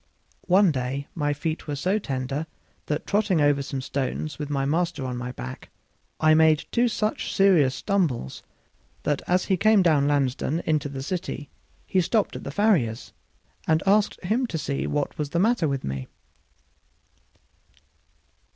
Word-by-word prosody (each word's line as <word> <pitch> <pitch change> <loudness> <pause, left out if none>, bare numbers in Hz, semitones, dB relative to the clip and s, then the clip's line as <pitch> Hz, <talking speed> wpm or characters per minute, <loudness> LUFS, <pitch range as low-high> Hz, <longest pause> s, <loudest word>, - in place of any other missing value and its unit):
One 190 0 +5
day 135 +1 -3
my 145 -3 0
feet 155 +3 -3
were 145 - -2
so 185 +9 0
tender 135 -1 -3 0.4
that, 150 +1 -2
trotting 205 -4 +1
over 145 -1 +3
some 135 -1 -4
fresh - - -8
stones 140 +3 -3
with 150 -1 -4
my 140 -2 0
master 165 -1 0
on 125 -1 -3
my 125 0 -4
back, 65 - -8 0.5
I 155 0 +5
made 155 -1 +4
two 240 +1 +3
such 215 -1 -2
serious 170 -10 +4
stumbles 165 - -1 0.6
that, 145 -2 0
as 180 +1 +2
he 190 - +1
came 215 0 +4
down 150 -5 +3
Lansdown 145 +2 0
into 150 -2 0
the 135 -1 -6
city, 155 -2 -4 0.3
he 185 - +2
stopped 210 +4 0
at - - -7
the - - -5
farrier's, 145 - +1 0.5
and 160 -1 +2
asked 205 +1 +3
him 230 +8 +1
to 165 - -3
see 140 -2 -2
what 145 -1 -2
was 150 -2 -2
the 170 - -1
matter 215 -4 +2
with 135 -2 -2
me. 65 -1 -4
155 Hz, 160 wpm, -25 LUFS, 140-185 Hz, 0.6 s, One